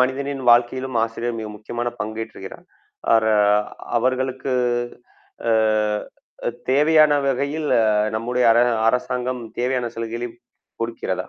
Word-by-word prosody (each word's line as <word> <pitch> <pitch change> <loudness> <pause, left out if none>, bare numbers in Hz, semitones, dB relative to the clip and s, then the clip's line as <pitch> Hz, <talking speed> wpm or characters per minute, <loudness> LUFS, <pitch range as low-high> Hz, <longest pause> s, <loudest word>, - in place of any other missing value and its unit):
மனிதனின் 135 +1 -1
வாழ்க்கையிலும் 120 +1 +2
ஆசிரியர் 115 +1 -4
மிக 110 - -5
முக்கியமான 120 +3 -4
பங்கேற்றுகிறார். 110 -2 -6 0.5
அர 110 -1 +4 0.7
அவர்களுக்கு 130 +1 -1 1.0
அ - - +4 1.2
தேவையான 150 +2 +5 0.2
வகையில் 140 +3 -1
அ - - +3 0.3
நம்முடைய 125 +3 0
அர 115 - +3 0.3
அரசாங்கம் 125 0 -2 0.2
தேவையான 125 -1 -1
சலுகைகளையும் 115 +1 -5 0.4
குடுக்கிறதா? 115 0 -3
125 Hz, 95 wpm, -22 LUFS, 115-130 Hz, 1.2 s, தேவையான